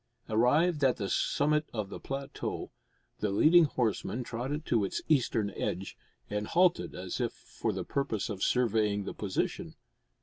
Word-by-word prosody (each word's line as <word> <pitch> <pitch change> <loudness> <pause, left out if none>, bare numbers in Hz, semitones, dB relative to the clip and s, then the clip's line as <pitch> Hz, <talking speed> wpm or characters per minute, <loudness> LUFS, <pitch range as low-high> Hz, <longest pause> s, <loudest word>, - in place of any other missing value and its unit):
Arrived 145 +8 +3
at 130 -2 +4
the 100 - -2
summit 150 +8 +1
of 105 -3 -2
the - - -7
plateau, 135 0 -5 0.5
the 105 - 0
leading 160 - +6
horseman 125 -2 -1
trotted 130 +7 -4
to 115 -4 +2
its 95 - -2
eastern 115 -8 +2
edge, 95 0 -3 0.3
and 105 0 -3
halted 180 0 +2
as 90 0 -4
if - - -1
for - - -4
the - - -4
purpose 125 -7 -1
of 100 -3 -5
surveying 110 -4 +2
the - - -5
position. 100 -3 -3
120 Hz, 155 wpm, -30 LUFS, 105-145 Hz, 0.5 s, leading